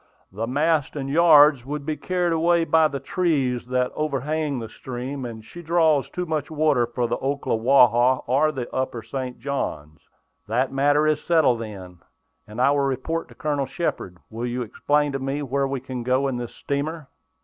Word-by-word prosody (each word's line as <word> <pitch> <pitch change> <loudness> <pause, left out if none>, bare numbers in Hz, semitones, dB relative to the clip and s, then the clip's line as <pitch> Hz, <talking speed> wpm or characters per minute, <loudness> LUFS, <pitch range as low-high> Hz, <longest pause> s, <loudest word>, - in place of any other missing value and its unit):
"The 110 +4 -4
masts 150 +3 +1
and 135 -2 -4
yards 150 -4 +6
would 145 +2 -5
be 155 - -2
carried 180 0 -1
away 170 +1 +3
by 160 -1 +4
the 140 -2 -5
trees 135 -10 -1
that 125 0 0
overhang 150 0 -2
the 115 -2 -5
stream, 130 +3 -6
and 110 -2 -8
she 175 - -10
draws 160 -4 +2
too 180 - -4
much 155 -3 -2
water 150 -6 +2
for 120 +1 -2
the - - -2
Ocklawaha 130 -2 +3
or 140 +5 +2
the 130 -5 -5
upper 130 -3 -2
St. 130 +2 -5
Johns." 75 - -5 0.4
"That 125 +5 0
matter 145 +2 +3
is 155 -1 +1
settled, 160 -8 +3
then, 95 -5 -9 0.5
and 105 +3 -9
I 135 +3 +4
will 145 - +1
report 140 +4 -2
to - - -17
Colonel 145 -3 -2
Shepard. 95 - -3
Will 115 +2 -4
you 125 +1 -2
explain 145 +6 0
to 135 - -3
me 135 +2 -3
where 140 +1 0
we 135 0 -3
can 130 -1 -6
go 130 +3 +1
in 130 -2 -2
this 120 -1 -6
steamer." 145 +2 -3
140 Hz, 180 wpm, -23 LUFS, 125-155 Hz, 0.5 s, yards